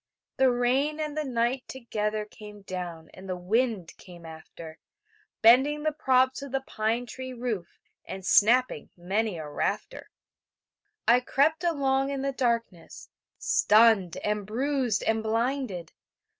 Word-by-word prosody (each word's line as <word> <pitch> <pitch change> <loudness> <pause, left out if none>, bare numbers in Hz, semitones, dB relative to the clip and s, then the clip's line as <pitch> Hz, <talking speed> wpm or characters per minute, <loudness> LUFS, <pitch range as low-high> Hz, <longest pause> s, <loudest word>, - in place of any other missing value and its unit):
The 265 -1 +5
rain 260 +5 +1
and 300 -1 -3
the 310 - -1
night 250 0 -1
together 215 -4 -3
Came 210 -1 -13
down, 175 -4 -7
and 190 0 -11
the 185 - -1
wind 210 -1 -1
came 175 -2 -14
after, 160 0 -11 0.6
Bending 270 +6 +5
the 310 - +1
props 260 -3 +2
of 280 -2 -8
the 270 0 -1
pine 225 +3 -1
tree 260 +1 -7
roof 235 -8 -4 0.3
And 190 -1 -7
snapping 235 - +3
many 195 +3 -1
a 155 -2 -6
rafter. 150 - -3 1.0
I 240 +1 +6
crept 295 +6 +1
along 275 -5 +1
in 275 -1 -3
the 275 - 0
darkness, 230 -9 -3 0.3
Stunned 210 -5 +4
and 210 -1 -2
bruised 255 -1 0
and 220 0 +1
blinded... 225 -4 -2
235 Hz, 135 wpm, -27 LUFS, 195-265 Hz, 1.0 s, I